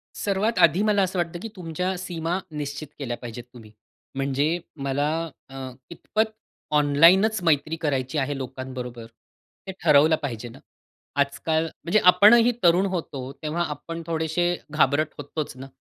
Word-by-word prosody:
सर्वात 205 +3 0
आधी, 185 - +5
मला 210 -2 +3
असं 185 -1 -2
वाटतं 170 0 -2
की 225 - -5
तुमच्या 180 +2 -3
सीमा 175 -1 -3
निश्चित 145 0 -5
केल्या 120 -4 -3
पाहिजेत 120 0 -8
तुम्ही. 110 -3 -13 0.4
म्हणजे 140 +5 0 0.2
मला 140 0 -1 0.4
अ, 135 - -12 0.3
इतपत 220 +6 -1 0.5
ऑनलाईनंच 170 +9 +5
मैत्री 155 -1 +2
करायची 135 -1 -1
आहे 145 0 -1
लोकांबरोबर, 130 -2 -6 0.6
हे - - -3
ठरवलं 155 0 +6
पाहिजे 120 -4 -5
ना. - - -13 0.6
आजकाल 155 +3 +1
म्हणजे 170 +5 0
आपणही 220 +6 +7
तरुण 175 +3 +5
होतो 145 -8 -4
तेव्हा 160 +3 -1
आपण 165 +3 -6
थोडेसे 160 +1 0 0.3
घाबरत 155 0 +2
होतोंच 145 -1 -5
ना. 135 +1 -8
155 Hz, 135 wpm, -24 LUFS, 135-175 Hz, 0.6 s, आपणही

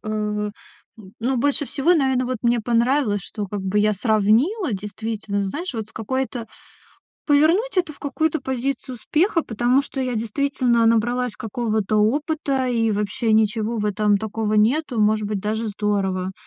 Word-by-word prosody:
м, 210 -1 -2 0.7
ну, 255 +3 0
больше 285 +4 +1
всего, 300 +6 +2
наверно, 265 -4 +2
вот 255 -1 -2
мне 235 -1 +2
понравилось, 235 -2 +1
что 205 -1 -5
как 205 +1 -4
бы 190 +2 0
я 210 +1 +3
сравнила 225 - +2
действительно, 205 0 -3
знаешь, 290 - -4
вот 220 -2 -4
с 225 - -15
какой-то 250 +1 -3 0.8
Повернуть 335 +10 +3
это 355 -3 +1
в - - -20
какую-то 315 +3 0
позицию 260 0 -3
успеха, 335 - +1
потому 245 +4 +1
что 275 - -8
я 250 -1 -2
действительно 235 +1 +1
набралась 240 +1 +2
какого-то 220 -2 -1
опыта, 275 +4 +1
и 230 -2 +1
вообще 210 +2 -1
ничего 220 +1 +1
в 210 - -1
этом 210 0 +2
такого 220 0 -3
нету, 245 +5 +2
и, - - -1
может 215 0 +2
быть, 205 -1 -2
даже 220 +2 -2
здорово. 195 -3 -1
230 Hz, 155 wpm, -22 LUFS, 210-265 Hz, 0.8 s, я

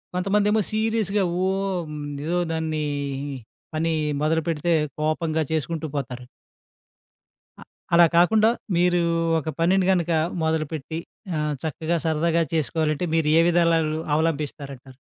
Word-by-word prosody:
కొంతమందేమో 205 +3 +2
సీరియస్‌గా 215 -2 +1 0.2
ఓహ్! 190 -4 -2 0.3
ఏదో 175 +2 0 0.2
దాన్ని 160 -1 -2 0.9
పని 165 +1 0 0.3
మొదలుపెడితే 160 +1 0 0.3
కోపంగా 155 +1 0
చేసుకుంటూ 160 +1 -2
పోతారు. 125 -2 -5 1.4
అ - - -9 0.3
అలా 170 0 +8
కాకుండా 215 +5 +5 0.3
మీరు 175 0 +3 0.4
ఒక 160 - -5
పనిని 185 +3 +3
గనక 175 -2 +1 0.3
మొదలుపెట్టి 160 0 -2 0.4
ఆహ్, 150 0 -1
చక్కగా 160 +2 -1
సరదాగా 165 +1 +2
చేసుకోవాలంటే 155 +2 0
మీరు 160 -2 +1
ఏ - - +5
విధాలాలు 165 -2 +2 0.2
అవలంబిస్తారంటారు? 140 -4 -3
165 Hz, 105 wpm, -24 LUFS, 155-175 Hz, 1.4 s, అలా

